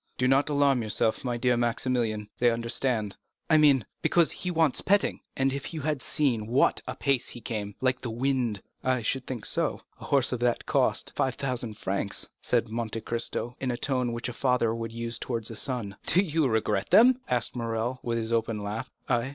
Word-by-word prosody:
"Do 125 Hz, -, +2 dB
not 135 Hz, +3 st, +3 dB
alarm 140 Hz, -3 st, +3 dB
yourself, 110 Hz, 0 st, 0 dB
my 120 Hz, -2 st, -1 dB
dear 125 Hz, +1 st, +2 dB
Maximilian—they 120 Hz, -1 st, 0 dB
understand." 115 Hz, -2 st, -1 dB, 0.3 s
"I 155 Hz, -, +7 dB
mean, 140 Hz, -7 st, +5 dB, 0.2 s
because 170 Hz, -2 st, +3 dB
he 180 Hz, -, -4 dB
wants 160 Hz, -5 st, +2 dB
petting. 200 Hz, 0 st, +2 dB, 0.2 s
If 135 Hz, +4 st, -1 dB
you 155 Hz, -, -3 dB
had 150 Hz, -2 st, -1 dB
seen 130 Hz, -7 st, +1 dB
at 105 Hz, -, -7 dB
what 125 Hz, +3 st, +3 dB
a -, -, -3 dB
pace 135 Hz, -4 st, 0 dB
he -, -, -6 dB
came—like 115 Hz, +3 st, -2 dB
the 120 Hz, -, -4 dB
wind!" 120 Hz, -3 st, -1 dB, 0.2 s
"I 130 Hz, -2 st, +1 dB
should 130 Hz, +3 st, -1 dB
think 120 Hz, -5 st, -4 dB
so,—a -, -, -3 dB
horse 140 Hz, -3 st, +2 dB
that 120 Hz, -1 st, 0 dB
cost -, -, +1 dB
5,000 125 Hz, -4 st, -2 dB
francs!" 100 Hz, +1 st, -2 dB
said 120 Hz, -1 st, +1 dB
Monte 115 Hz, 0 st, -3 dB
Cristo, 120 Hz, +1 st, -3 dB
in 130 Hz, -, -2 dB
the 120 Hz, -, -1 dB
tone 125 Hz, -1 st, 0 dB
which 120 Hz, +1 st, -3 dB
a 125 Hz, -, -5 dB
father 125 Hz, -3 st, +1 dB
would 115 Hz, -1 st, -4 dB
use 115 Hz, 0 st, -3 dB
towards 115 Hz, -3 st, -3 dB
a -, -, -7 dB
son. 110 Hz, -3 st, -3 dB
"Do 180 Hz, -, +5 dB
you 160 Hz, -5 st, +1 dB
regret 110 Hz, -4 st, 0 dB
them?" 255 Hz, +3 st, +6 dB
asked 120 Hz, -1 st, 0 dB
Morrel, 115 Hz, +1 st, -2 dB
with 115 Hz, -1 st, -1 dB
his 115 Hz, 0 st, -2 dB
open 115 Hz, -1 st, 0 dB
laugh. 105 Hz, +5 st, -4 dB, 0.2 s
"I? 120 Hz, 0 st, +1 dB
120 Hz, 185 wpm, -28 LUFS, 115-135 Hz, 0.3 s, I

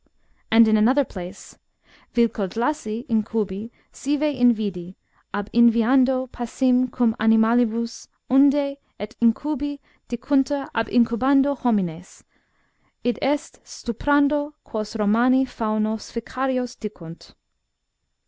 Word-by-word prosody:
And 225 Hz, 0 st, +6 dB
in 215 Hz, 0 st, +4 dB
another 255 Hz, +6 st, +3 dB
place: 185 Hz, -1 st, -10 dB, 0.3 s
" -, -, -30 dB
Vilkodlaci, 230 Hz, +2 st, -1 dB
incnbi, 215 Hz, -2 st, -2 dB, 0.2 s
sive 290 Hz, +2 st, -2 dB
invidi, 210 Hz, -8 st, 0 dB, 0.4 s
ab 205 Hz, 0 st, -4 dB
inviando 250 Hz, +3 st, +4 dB
passim 250 Hz, +1 st, 0 dB
cum 235 Hz, -3 st, +1 dB
animalibus, 225 Hz, +1 st, +2 dB, 0.2 s
undo 280 Hz, +1 st, +3 dB, 0.2 s
et 210 Hz, +4 st, -7 dB
incubi 285 Hz, +4 st, 0 dB, 0.3 s
dicuntur 270 Hz, +3 st, 0 dB
ab 225 Hz, -1 st, -1 dB
iucubando 265 Hz, +4 st, +2 dB
homines, 190 Hz, -9 st, -2 dB, 0.8 s
i. -, -, +3 dB
e. -, -, +1 dB, 0.2 s
stuprando, 290 Hz, +1 st, -1 dB
quos 215 Hz, 0 st, -6 dB
Romani 235 Hz, +5 st, +3 dB
faunos 215 Hz, -2 st, -3 dB
ficarios 255 Hz, +1 st, -3 dB
dicunt. 170 Hz, -6 st, -10 dB
235 Hz, 95 wpm, -22 LUFS, 215-265 Hz, 0.8 s, And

